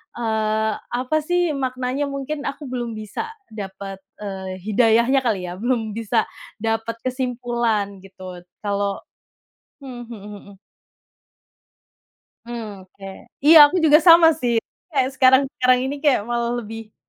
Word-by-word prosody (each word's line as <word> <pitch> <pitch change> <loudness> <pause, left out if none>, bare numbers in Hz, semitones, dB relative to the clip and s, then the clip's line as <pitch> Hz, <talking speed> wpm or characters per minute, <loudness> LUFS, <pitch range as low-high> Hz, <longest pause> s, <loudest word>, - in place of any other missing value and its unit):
eee, 220 -1 0 0.2
apa 255 +5 -1
sih 350 +2 0
maknanya 260 0 -2
mungkin 280 +1 -4
aku 280 +2 -6
belum 240 -3 -4
bisa 215 - -5 0.2
dapat, 195 -2 -7 0.2
eee, 190 -2 -5
hidayahnya 230 +5 +3
kali 225 -8 -1
ya, 180 - -9
belum 230 -1 -1
bisa 225 +1 0 0.4
dapat 225 0 -1
kesimpulan 240 -5 -2
gitu 185 -1 -11 0.2
kalau 200 -1 -2 0.8
hmm, 245 -3 -8
mhm 230 -2 -9 0.2
mhm. 200 0 -15 1.9
Hmm, 215 -5 -7
oke. 190 +1 -26 0.4
Iya 315 +3 +8
aku 290 - -3
juga 305 -1 +7
sama 330 0 +7
sih, 240 -1 0 0.3
kayak 270 -7 0
sekarang-sekarang 260 -1 +4
ini 265 +2 -2
kayak 280 -7 +2
malah 235 0 -1
lebih 220 0 -9
235 Hz, 125 wpm, -21 LUFS, 210-265 Hz, 1.9 s, Iya